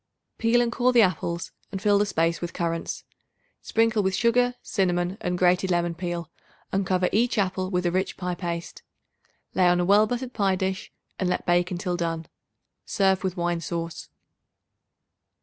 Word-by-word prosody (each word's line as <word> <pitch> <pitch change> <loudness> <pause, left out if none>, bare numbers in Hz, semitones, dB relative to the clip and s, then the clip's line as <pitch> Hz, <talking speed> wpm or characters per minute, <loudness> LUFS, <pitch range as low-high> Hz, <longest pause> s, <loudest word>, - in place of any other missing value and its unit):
Peel 230 +1 +3
and 235 -1 0
core 250 +1 +2
the 240 -2 +6
apples 170 -2 -1 0.2
and 195 - -4
fill 205 0 +3
the 205 - +2
space 165 -3 0
with 175 -1 -4
currants. 165 -1 -3 0.6
Sprinkle 225 -1 +2
with 190 -1 0
sugar, 245 +2 +2
cinnamon 180 -2 0
and 180 0 -1
grated 180 +1 +3
lemon 175 -1 +1
peel, 175 -1 -4 0.4
and 195 -1 0
cover 185 -1 +2
each 235 +3 +2
apple 185 -2 0
with 180 -1 -1
a 175 - +2
rich 185 +1 -1
pie 180 -1 -2
paste. 170 -1 -5 0.7
Lay 185 -1 +4
on 175 0 +4
a 175 - +1
well 205 +3 +5
buttered 245 +2 -4
pie 195 -3 +2
dish 190 0 -3 0.3
and 185 - 0
let - - -1
bake 175 0 +2
until 180 0 -2
done. 165 -1 -2 0.6
Serve 190 -2 +1
with 185 -1 -2
wine 175 -1 -1
sauce. 165 0 -5
185 Hz, 170 wpm, -25 LUFS, 175-200 Hz, 0.7 s, the